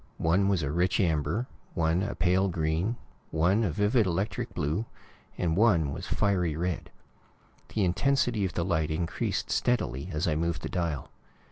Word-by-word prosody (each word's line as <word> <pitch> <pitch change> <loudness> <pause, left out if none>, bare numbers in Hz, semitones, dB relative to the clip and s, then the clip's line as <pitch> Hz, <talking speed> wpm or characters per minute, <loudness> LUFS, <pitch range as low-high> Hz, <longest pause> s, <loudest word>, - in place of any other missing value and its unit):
One 90 +5 +2
was 95 -5 +1
a 70 - -1
rich 90 +6 +1
amber, 80 - +1 0.3
one 85 0 +2
a 100 - -2
pale 90 +2 +2
green, 85 +5 0 0.3
one 90 +8 +2
a 100 - +1
vivid, 105 - +2
electric 95 +3 -2
blue, 80 +10 -1 0.5
and 80 -2 0
one 85 -9 +3
was - - -6
fiery 90 -6 +1
red. 85 +1 -2 0.9
The 105 -3 +3
intensity 120 +3 +1
of 95 - -1
the 85 - -1
light 80 -4 +1
increased 80 +2 -2
steadily 90 - 0
as 75 0 -1
I 80 - +2
moved 85 +3 -1
the - - -3
dial. 85 -6 -2
90 Hz, 160 wpm, -28 LUFS, 80-100 Hz, 0.9 s, one